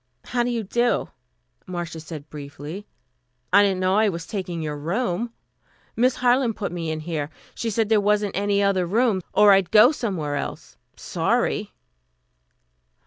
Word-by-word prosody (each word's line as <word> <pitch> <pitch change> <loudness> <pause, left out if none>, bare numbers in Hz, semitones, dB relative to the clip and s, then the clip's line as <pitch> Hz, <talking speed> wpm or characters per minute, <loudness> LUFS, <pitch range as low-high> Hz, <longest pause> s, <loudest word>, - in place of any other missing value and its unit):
"How 245 - -1
do 240 - 0
you 235 -2 -1
do?" 240 +5 0 0.6
Marcia 175 -2 -5
said 155 -2 -9
briefly. 150 +6 -8 0.7
"I 200 - +8
didn't 195 -2 +2
know 185 +2 +2
I 215 0 +4
was 170 -3 -5
taking 180 -5 -4
your 150 -1 -3
room. 185 +8 -2 0.6
Miss 250 +2 +3
Harland 245 -2 +2
put 200 - -4
me 170 -2 -4
in 155 0 -3
here. 155 -3 -3 0.2
She 230 - -3
said 220 0 0
there 220 -2 +4
wasn't 205 0 +1
any 200 0 +1
other 190 -3 +1
room, 215 0 +2
or 210 -1 +6
I'd 195 -2 +4
go 220 +6 +7
somewhere 175 - -2
else. - - -6 0.2
I'm - - -42
sorry." - - -1
195 Hz, 160 wpm, -23 LUFS, 170-220 Hz, 0.7 s, I